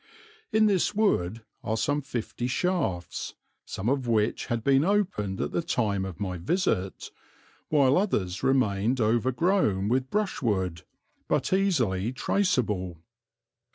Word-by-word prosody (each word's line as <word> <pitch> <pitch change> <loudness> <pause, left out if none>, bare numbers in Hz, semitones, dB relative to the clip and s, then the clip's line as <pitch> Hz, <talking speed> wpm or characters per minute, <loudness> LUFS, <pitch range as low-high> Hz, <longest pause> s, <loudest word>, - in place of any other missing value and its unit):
In 220 0 +4
this 200 0 +2
wood 115 - +1 0.2
are 110 - -1
some 145 +5 0
fifty 120 -2 -4
shafts, 125 - -2 0.3
some 95 - -5
of 130 -1 0
which 110 -1 +1
had 115 -3 -2
been 135 +2 +4
opened 175 - 0
at - - -2
the - - 0
time 105 - 0
of 95 -2 -7
my 95 -3 -3
visit, 100 - -1 0.6
while 140 0 +4
others 100 - -1
remained 125 -2 +1
overgrown 120 - +1
with 130 +2 0
brushwood 105 - -1 0.5
but - - 0
easily 120 - +1
traceable. 105 - 0
120 Hz, 120 wpm, -27 LUFS, 100-165 Hz, 0.6 s, In